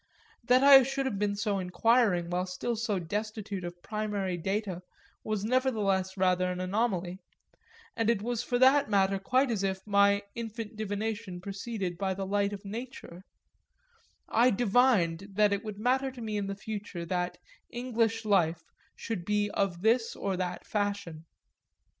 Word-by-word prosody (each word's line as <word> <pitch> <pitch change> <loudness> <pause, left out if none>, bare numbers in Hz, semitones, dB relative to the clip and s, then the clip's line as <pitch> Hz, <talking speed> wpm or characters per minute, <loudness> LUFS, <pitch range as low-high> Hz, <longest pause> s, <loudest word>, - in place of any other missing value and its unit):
That 250 +2 +4
I 275 -1 +10
should 270 +1 -2
have 205 -7 -2
been 205 -1 0
so 200 -1 -1
inquiring 185 -1 +2
while 180 +1 -1
still 185 +6 -3
so 220 -2 -1
destitute 205 +2 -4
of 175 0 -8
primary 210 -4 -2
data 190 +1 -2 0.4
was 215 -2 -2
doubtless 210 -6 +1
rather 185 -1 +2
an 180 - -4
anomaly; 185 -2 -1 0.8
and 225 -1 +1
it 220 -3 +1
was 240 0 -1
for 245 0 -1
that 270 +2 +5
matter 195 -1 +2
quite 255 +6 +2
as 215 -4 -1
if 190 -1 -2
my 200 0 +3
infant 225 -1 -6
divination 210 -2 -3
proceeded 195 -2 -5
by 190 -1 -1
the 195 0 -4
light 200 +1 0
of 200 0 -8
nature: 220 -4 -8 1.1
I 235 +3 +4
divined 200 -5 +2
that 205 0 +3
it 200 - -2
would 215 -2 -6
matter 260 +5 +1
to 255 -2 -10
me 215 -2 -3
in 205 -1 -2
the 195 - -3
future 200 -4 -6
that 180 +1 -2 0.3
"English 230 -2 -1
life" 175 -5 +2 0.3
should 220 -6 -4
be 210 +2 0
of 185 -2 -1
this 230 +1 +2
or 195 - -2
that 180 -1 -4
fashion. 200 -6 -3
205 Hz, 160 wpm, -29 LUFS, 190-225 Hz, 1.1 s, I